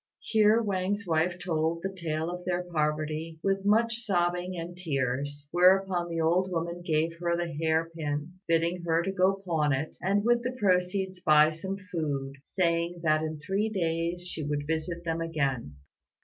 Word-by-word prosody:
Here 220 +1 +4
Wang's 200 +1 -1
wife 170 +1 +1
told 165 -2 -1
the 195 0 -3
tale 165 -2 -2
of 180 0 -6
their 180 0 -1
poverty, 155 -1 -2
with 195 0 +1
much 225 +3 +3
sobbing 180 -2 0
and 170 +1 -6
tears; 145 -3 -2
whereupon 180 0 +4
the 165 -1 -2
old 175 +3 +2
woman 170 0 -3
gave 165 -1 0
her 170 0 +1
the 170 -1 -3
hair 160 +2 +1
pin, 150 +3 -4
bidding 170 +2 +1
her 170 0 +1
go 195 +1 +2
pawn 155 -4 +1
it, 135 +4 -3
and 200 +3 +1
with 240 0 +4
the 250 +1 -3
proceeds 185 -1 +1
buy 155 -1 +5
some 190 +5 -5
food, 140 -5 -2
saying 170 +1 0
that 155 -1 +3
in 155 0 -3
three 195 +7 -1
days 170 -2 -1
she 180 - -4
would 145 0 -2
visit 160 +2 -2
them 165 -1 -2
again. 140 - -2
170 Hz, 165 wpm, -28 LUFS, 155-185 Hz, -, buy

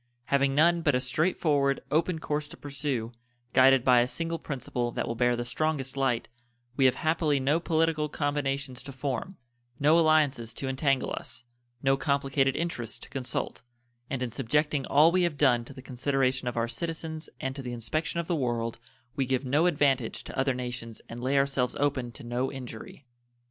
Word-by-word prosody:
Having 140 -1 +3
none 170 +3 +4
but 145 -5 +2
a - - +3
straight 145 +8 0
forward, 140 -3 +2
open 165 +2 +2
course 150 -1 -2
to - - -12
pursue, 140 -5 -3 0.4
guided 135 -1 +6
by 125 -1 +6
a 120 - +3
single 165 +4 -3
principle 125 -4 -3
that - - -3
will - - -1
bear 120 +1 +2
the 120 0 -3
strongest 135 0 -1
light, 135 -4 0 0.5
we 135 - +3
have 130 - +5
happily 155 -3 +1
no 140 +5 +2
political 160 -2 +1
combinations 140 -3 -2
to 140 - -8
form, 140 +7 -4 0.4
no 155 +4 +5
alliances 145 -8 +2
to 135 - -4
entangle 135 0 +1
us, - - -6 0.4
no 135 0 +3
complicated 135 -1 +1
interests 125 -10 -3
to - - -12
consult, 130 -3 -3 0.5
and 130 -2 -2
in 120 - -3
subjecting 140 +4 0
all 155 +4 +6
we 185 +1 +3
have 170 -4 0
done 125 -5 +4
to - - -11
the 130 - -10
consideration 130 0 0
of 120 - -3
our 115 0 +1
citizens 160 +5 -5
and 130 0 -3
to 140 - -5
the 125 -2 -5
inspection 155 +8 -2
of 170 - -2
the 175 - +1
world 120 -5 -1 0.4
we 135 -2 0
give 130 +1 0
no 145 +7 +3
advantage 135 -7 +1
to - - -8
other 135 -1 +1
nations 125 -2 -5
and 115 +1 -7
lay 135 +3 +1
ourselves 135 -2 +1
open 135 -4 0
to - - -12
no 120 +2 -2
injury. 130 0 -9
135 Hz, 185 wpm, -28 LUFS, 125-150 Hz, 0.5 s, guided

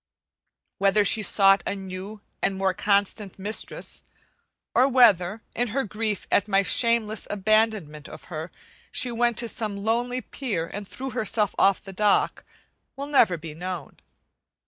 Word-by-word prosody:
Whether 200 +1 +3
she 220 - +2
sought 195 0 +4
a - - -1
new 195 +2 -8 0.2
and 195 -1 0
more 190 -1 +1
constant 200 0 0
mistress, 205 +3 -3 0.7
or 255 +2 +5
whether, 215 -6 +4
in 245 +1 0
her 265 +5 -1
grief 210 0 -3
at 205 - +3
my 195 -1 +3
shameless 225 0 +2
abandonment 205 -7 0
of - - -11
her, 160 0 -6 0.4
she 250 - +1
went 235 -1 +1
to 235 - 0
some 215 -3 -2
lonely 240 +4 -1
pier 215 -14 -4
and 205 -1 -6
threw 265 +5 -6
herself 215 -2 -1
off 195 -1 +3
the 195 -2 -10
dock, 205 +1 +1 0.5
will 275 +1 -5
never 250 -11 +3
be 155 -1 -8
known. 175 -2 -6
205 Hz, 145 wpm, -25 LUFS, 190-230 Hz, 0.7 s, or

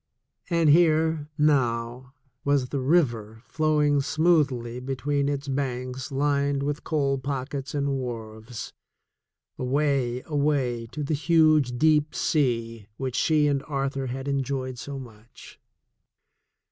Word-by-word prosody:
And 165 -3 +4
here, 160 -2 +3
now, 125 -3 0 0.3
was 140 -3 +1
the 140 - -2
river 120 -7 +1
flowing 150 -2 +2
smoothly 140 -7 +1
between 140 +2 -1
its 140 0 -3
banks 130 -1 -3
lined 140 0 +1
with 145 +1 -3
coal 140 -3 0
pockets 135 +1 -4
and 140 -1 0
wharves 115 -4 -5 0.4
— - - -43
away, 130 -2 0
away 140 -6 0
to 150 +6 -5
the 145 - -1
huge 155 -4 +3
deep 150 +1 +3
sea 115 -7 0
which 130 -2 -3
she 150 +2 +3
and 140 -2 +1
Arthur 135 -2 -2
had 130 +2 -5
enjoyed 135 -2 -2
so 140 +2 -6
much. 115 -3 -13
140 Hz, 120 wpm, -26 LUFS, 125-150 Hz, 0.4 s, And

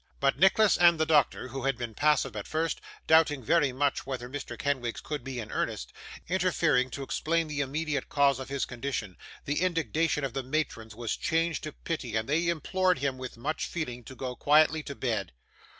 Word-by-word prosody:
But, 135 -1 +2
Nicholas 200 +2 +5
and 170 -2 +6
the 160 - +3
doctor 150 -4 +2
who 135 +1 -5
had 135 -2 +1
been 120 -2 -5
passive 145 -3 +2
at 105 - -5
first, 160 0 -1 0.2
doubting 155 -4 +4
very 150 +1 +3
much 140 +2 0
whether 130 -2 -5
Mr. 130 -3 -6
Kenwigs 130 -5 -1
could 150 -4 -5
be 130 -1 -5
in 105 -2 -6
earnest - - -3 0.3
interfering 170 -8 +2
to 135 +2 -5
explain 165 +4 0
the 150 -1 -2
immediate 145 +1 -2
cause 140 -2 +3
of 130 - -7
his 140 -1 -1
condition, 120 -6 -4 0.3
the 145 +3 -1
indignation 165 -3 +1
of 135 -4 -2
the 135 - -1
matrons 125 -5 -3
was 120 0 -2
changed 165 0 0
to 155 - -4
pity, 140 -8 -4
and 110 0 0
they 160 +4 +1
implored 180 +2 +1
him, 135 -1 -2
with 130 -2 -7
much 150 +7 -2
feeling, 125 -8 -4
to 130 - -10
go 125 -1 -4
quietly 155 +3 +4
to 140 -2 -7
bed. 115 - -2
140 Hz, 195 wpm, -29 LUFS, 130-160 Hz, 0.3 s, and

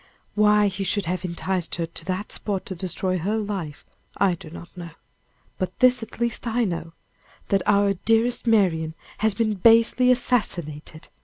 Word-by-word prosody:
Why 210 0 +4
he 195 0 -3
should 200 0 +1
have 180 +2 -3
enticed 180 0 -2
her 170 - -2
to 165 0 -9
that 190 +3 -3
spot 200 -3 -3
to 190 - -5
destroy 185 +1 -2
her 205 +6 -1
life, 195 -8 -5 0.3
I 195 -2 +3
do 165 -2 -9
not 170 +2 -12
know. 175 -2 -8 0.7
But 185 -1 -3
this, 255 0 +4
at 225 - -10
least, 235 0 -1
I 235 +1 +1
know: 165 -3 -4 0.6
that 195 -1 +2
our 200 -1 +3
dearest 225 +5 +1
Marian 165 -8 +2 0.2
has 220 -2 +1
been 215 0 +1
basely 230 +5 +4
assassinated. 170 - -1
195 Hz, 165 wpm, -24 LUFS, 175-220 Hz, 0.7 s, Why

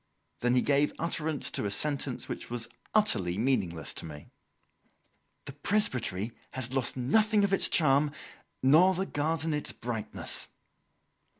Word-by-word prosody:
Then 120 +1 +1
he 125 - +3
gave 145 +1 +2
utterance 160 -2 -1
to - - -2
a - - 0
sentence 140 +3 -2
which - - -6
was 120 -2 -2 0.3
utterly 100 - +2
meaningless 95 - -1
to - - -5
me. 75 -2 -11 1.1
"The 140 - -7
presbytery 130 - 0 0.2
has 130 -1 -2
lost 135 -1 0
nothing 210 - +3
of 200 -1 +1
its - - +4
charm, 145 -2 +4 0.5
nor 165 +8 +6
the 190 +2 -1
garden 160 0 -1
its 150 - -1
brightness." 115 -3 -2
140 Hz, 135 wpm, -29 LUFS, 120-160 Hz, 1.1 s, nor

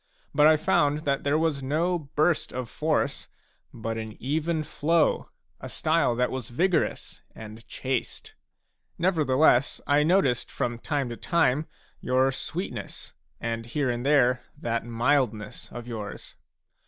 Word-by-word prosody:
But 150 +1 +6
I 155 0 +6
found 150 -1 +2
that 140 -3 -1
there 145 +2 +2
was 160 -3 0
no 165 +6 0
burst 155 +2 0
of 125 -1 -4
force, 150 -3 -1 0.4
but 115 -1 -4
an 110 -1 -6
even 155 +4 -1
flow, 160 +2 +1 0.3
a - - -7
style 155 -6 +1
that 125 +1 +1
was 130 -4 -5
vigorous 175 +9 0
and 110 +1 -10
chaste. 130 -2 -4 0.6
Nevertheless 150 -6 +3
I 145 +1 +4
noticed 150 -6 +2
from 120 -1 -3
time 140 -1 -2
to 120 - -6
time 155 -3 +1 0.3
your 130 +1 +2
sweetness, 135 - -6 0.3
and 115 0 -3
here 130 +1 0
and 120 0 -3
there 125 -3 +3 0.2
that 115 0 -2
mildness 115 -2 -1
of 120 0 -8
yours. 110 -4 -7
135 Hz, 135 wpm, -26 LUFS, 120-155 Hz, 0.6 s, But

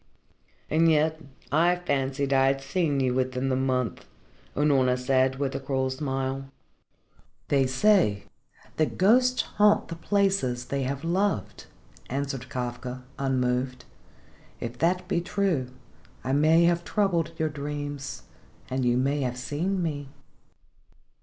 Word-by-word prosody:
"And 165 +1 +3
yet 155 +1 +2 0.3
I 170 +5 +4
fancied 140 -4 -1
I 135 0 +4
had 135 0 +1
seen 145 +1 0
you 130 -2 +1
within 130 +1 -1
the 130 - +1
month," 130 -2 -1 0.5
Unorna 135 -4 +3
said, 130 +1 +2
with 135 -1 -1
a - - -2
cruel 130 -1 -1
smile. 135 -1 -3 1.0
"They 135 -2 +3
say 130 - +3 0.5
that 155 - 0
ghosts 250 +6 +4
haunt 210 0 +3
the 165 - -4
places 190 -10 0
they 140 +1 -2
have 135 +3 -3
loved," 180 - -1 0.4
answered 135 -1 -3
Kafka 125 -1 -5 0.2
unmoved. 125 -1 -1 0.7
"If 120 0 -5
that 180 +2 +1
be 175 -2 0
true 175 -7 0 0.6
I 130 - -1
may 155 +4 +5
have 170 0 +2
troubled 170 -6 0
your 155 0 0
dreams 145 -1 -5 0.5
and 130 0 0
you 120 0 +2
may 140 +3 +1
have 125 -1 -2
seen 175 +9 -2
me. 145 -4 -3
140 Hz, 130 wpm, -27 LUFS, 130-165 Hz, 1.0 s, may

